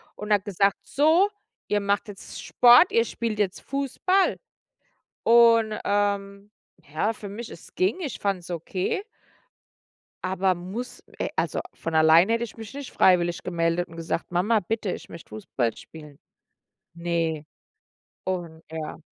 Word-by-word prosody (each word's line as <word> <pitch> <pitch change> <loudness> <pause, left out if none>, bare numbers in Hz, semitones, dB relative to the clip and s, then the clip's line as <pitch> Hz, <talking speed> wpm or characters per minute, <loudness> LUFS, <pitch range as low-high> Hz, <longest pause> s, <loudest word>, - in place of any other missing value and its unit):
und 210 0 -1
hat 200 -1 +2
gesagt: 200 0 +1
„So, 320 +8 +3 0.4
ihr 210 - +2
macht 200 +2 0
jetzt 195 - -9
Sport, 245 +8 +6
ihr 230 0 +3
spielt 225 -2 -3
jetzt 195 -3 -1
Fußball“ 280 +8 +1 0.9
und, 230 -2 +5
ähm, 200 0 -1 0.4
ja, 210 +8 0
für 205 - -9
mich, 225 +3 -7
es - - -13
ging, 190 - 0
ich 290 -8 -4
fand's 185 -3 -2
okay 180 - -2 1.2
aber 190 0 +1
muss, 190 +8 -7 0.2
äh - - -1
also - - 0
von 165 -1 -5
allein 160 +4 +6
hätte 230 +1 +1
ich 230 - -10
mich 225 +3 -9
nicht 285 -2 -7
freiwillig 175 -2 +3
gemeldet 170 0 -1
und 165 - -13
gesagt: 165 +1 -3
„Mama, 210 +5 +2
bitte, 210 0 -2
ich - - -8
möchte 170 - -11
Fußball 115 +2 -2
spielen.“ 150 -3 -13 0.8
Ne, 165 -3 -2 0.8
und 170 -4 -4
ja. 160 0 -6
200 Hz, 140 wpm, -25 LUFS, 170-225 Hz, 1.2 s, Sport